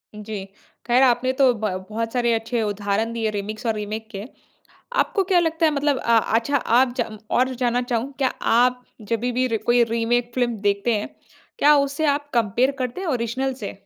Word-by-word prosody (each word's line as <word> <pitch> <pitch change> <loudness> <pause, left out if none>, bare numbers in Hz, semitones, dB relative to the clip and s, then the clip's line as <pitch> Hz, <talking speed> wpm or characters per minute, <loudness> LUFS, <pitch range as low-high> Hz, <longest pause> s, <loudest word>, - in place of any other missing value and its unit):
जी। 210 -2 -6 0.4
ख़ैर 250 +2 +4
आपने 250 0 +3
तो 260 -2 +5
ब 215 -1 -2 0.2
बहुत 225 +1 -3
सारे 240 -2 +2
अच्छे 230 +1 -1
उदाहरण 205 +2 -1
दिए 225 -2 -1
रीमिक्स 215 +3 -5
और 225 - +2
रीमेक 215 +1 -5
के। 200 -1 -6 0.8
आपको 390 - 0
क्या 370 -1 +3
लगता 325 0 +1
है 310 - +2
मतलब 285 -1 +1
अ, 235 -1 +3
अच्छा 230 +6 +1
आप 250 0 +2
जा 240 - -1 0.3
और 260 +1 +2
जानना 245 0 0
चाहूँ 245 +2 -2
क्या 270 -2 +2 0.3
आप 250 +1 +3 0.3
जभी 240 +2 0
भी 255 +1 +1
कोई 240 +2 +3
रीमेक 235 +1 0
फ़िल्म 245 -2 0
देखते 200 +3 +1
हैं, 210 - -2 0.5
क्या 300 -6 +6
उसे 280 +2 0
आप 290 0 0
कंपेयर 235 +3 +2
करते 255 +5 -3
हैं 380 - -3
ओरिजिनल 260 0 -1
से? 230 -6 -6
240 Hz, 185 wpm, -22 LUFS, 225-260 Hz, 0.8 s, क्या